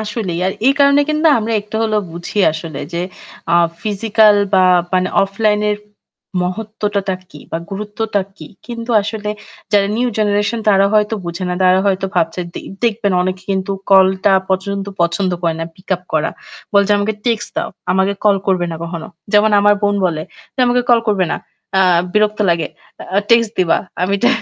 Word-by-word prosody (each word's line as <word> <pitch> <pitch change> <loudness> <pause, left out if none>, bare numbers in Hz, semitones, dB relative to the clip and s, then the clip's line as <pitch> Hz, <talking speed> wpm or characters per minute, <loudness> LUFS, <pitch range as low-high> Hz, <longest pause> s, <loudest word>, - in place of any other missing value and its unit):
আসলেই। 210 -5 -3
আর 190 - 0
এই 270 - +6
কারণে 280 0 +5
কিন্তু 305 +1 +1
আমরা 225 +1 -2
একটু 210 +1 -15
হলেও 215 -1 +1
বুঝি 175 +4 -6
আসলে 155 -2 -6
যে 170 - -2 0.5
আ - - +5 0.3
ফিজিক্যাল 215 0 +3 0.2
বা 190 -1 +5 0.3
মানে 185 0 +2
অফলাইন 210 +2 +1
এর 205 - 0 0.7
মহত্বটা 205 0 -2 0.2
কী - - -12
বা 165 - -2
গুরুত্বটা 210 +1 -2 0.2
কী? - - -10 0.2
কিন্তু 235 0 -6
আসলে 210 0 -4 0.4
যারা 200 -1 +4
নিউ 245 +1 +1
জেনারেশন, 210 +2 +1
তারা 195 -1 +5
হয়তো 210 +1 +2
বুঝে 170 +2 -4
না। 180 - -1
তারা 185 0 +4
হয়তো 195 -1 +1
ভাবছে 170 0 0
দে - - -5 0.2
দেখবেন 215 -4 +1
অনেকে 185 0 -3
কিন্তু 190 0 -1 0.2
কলটা 190 0 +5 0.2
পচন্দ 195 +1 -1 0.2
পছন্দ 170 +3 +1
করে 165 -1 +1
না - - -1
pick 185 - -22
up 180 - -9
করা। 155 0 +1 0.4
বলছে 200 0 +4
"আমাকে 215 +2 -1
টেক্সট 230 -3 0
দাও। - - -1 0.2
আমাকে 190 +2 +2
কল 205 -2 +5
করবে 185 -2 +1
না 165 - -4
কখনো।" 170 -1 -5 0.3
যেমন 210 +1 +5
আমার 205 0 +5
বোন 205 0 +2
বলে। 155 -3 -2 0.3
যে 265 - -3
"আমাকে 245 0 +2
কল 235 - +6
করবে 190 -4 +2
না। - - 0 0.4
আ - - +5 0.3
বিরক্ত 215 0 +2
লাগে। 165 -2 0 0.5
আ - - +6
টেক্সট 230 -2 +5
দিবা।" 180 -3 +3 0.2
আমি 190 +2 +1
টা 245 - +5
200 Hz, 175 wpm, -17 LUFS, 185-215 Hz, 0.7 s, এই